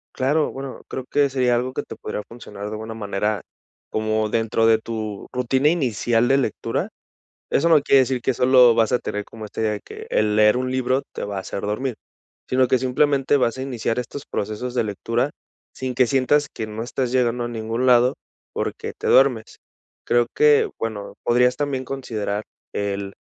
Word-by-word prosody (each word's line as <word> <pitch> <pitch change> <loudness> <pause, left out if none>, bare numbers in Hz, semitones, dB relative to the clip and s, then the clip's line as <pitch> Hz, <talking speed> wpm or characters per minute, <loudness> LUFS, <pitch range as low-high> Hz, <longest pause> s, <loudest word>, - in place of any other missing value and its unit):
Claro, 145 +4 +1
bueno, 135 -1 -7
creo 130 - -5
que 145 -1 +3
sería 125 -2 +2
algo 125 +2 -1
que - - -3
te - - -9
podría 105 - -5
funcionar 105 -4 -10
de 105 - -5
alguna 110 +1 -5
manera 105 -1 -2 0.5
como 110 0 0
dentro 115 0 +1
de 115 0 +6
tu 110 -2 -5
rutina 130 +3 +2
inicial 120 -6 +1
de 135 - +4
lectura, 125 -6 -2 0.6
eso 165 - +3
no 160 -3 +6
quiere 140 -1 +5
decir 130 -1 0
que 130 - +1
solo 125 -1 +6
vas 115 -1 +3
a 125 - +2
tener 105 0 -4
como, 110 +1 -10
este, 105 - -7
de 105 -2 0
que - - -10
el 105 -1 +1
leer 105 +1 +5
un 130 0 -1
libro 130 +1 +1
te - - -5
va 100 -1 -5
a - - -2
hacer 95 - -6
dormir, 115 +5 -2 0.5
sino 130 0 +3
que 130 - +3
simplemente 135 +2 +2
vas 125 -1 0
a - - -3
iniciar 125 -3 -2
estos 125 +3 -5
procesos 110 +3 -4
de 125 - +1
lectura 115 +6 -1 0.4
sin 130 -1 -4
que 125 - +5
sientas 140 +3 +2
que 110 - -4
no 110 +2 -5
estás 125 0 -2
llegando 125 -1 +1
a - - -3
ningún 115 +2 -2
lado 125 0 +5 0.4
porque - - -4
te - - -3
duermes. 130 -5 +3 0.5
Creo 120 0 +3
que, 150 -1 +4
bueno, 110 -3 -4
podrías 125 +1 +3
también 140 -3 -2
considerar 110 -6 -3 0.3
el 100 -1 -3
120 Hz, 190 wpm, -22 LUFS, 110-130 Hz, 0.6 s, de